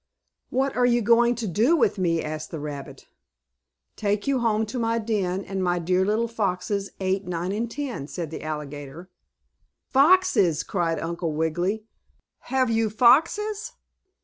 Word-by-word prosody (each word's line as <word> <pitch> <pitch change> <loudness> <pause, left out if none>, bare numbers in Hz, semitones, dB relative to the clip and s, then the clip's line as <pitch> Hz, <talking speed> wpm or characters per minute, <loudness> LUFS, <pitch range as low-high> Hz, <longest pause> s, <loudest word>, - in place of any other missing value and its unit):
"What 270 +2 0
are 245 - +3
you 240 -1 +2
going 235 +2 +4
to 230 -2 -4
do 225 - +3
with 220 -9 +1
me?" 165 -3 +1
asked 155 0 -5
the 160 - -6
rabbit. 145 -2 -7 0.9
"Take 205 0 -1
you 275 -2 +1
home 220 -2 +1
to 230 +4 -5
my 230 0 +1
den, 200 -4 -1
and 190 -1 -3
my 175 -1 +1
dear 180 +2 +1
little 215 +4 +1
foxes, 200 -2 -2
Eight, 190 0 -1
Nine 175 +1 -2
and 220 +3 -2
Ten," 250 - -5
said 165 -1 -5
the - - -6
alligator. 150 +2 -7 0.8
"Foxes!" 280 - +4
cried 170 -4 -1
Uncle 170 -1 -3
Wiggily. 175 +7 -1 0.7
"Have 260 -2 +2
you 225 -1 +1
foxes?" 410 - +3
205 Hz, 150 wpm, -25 LUFS, 170-235 Hz, 0.9 s, going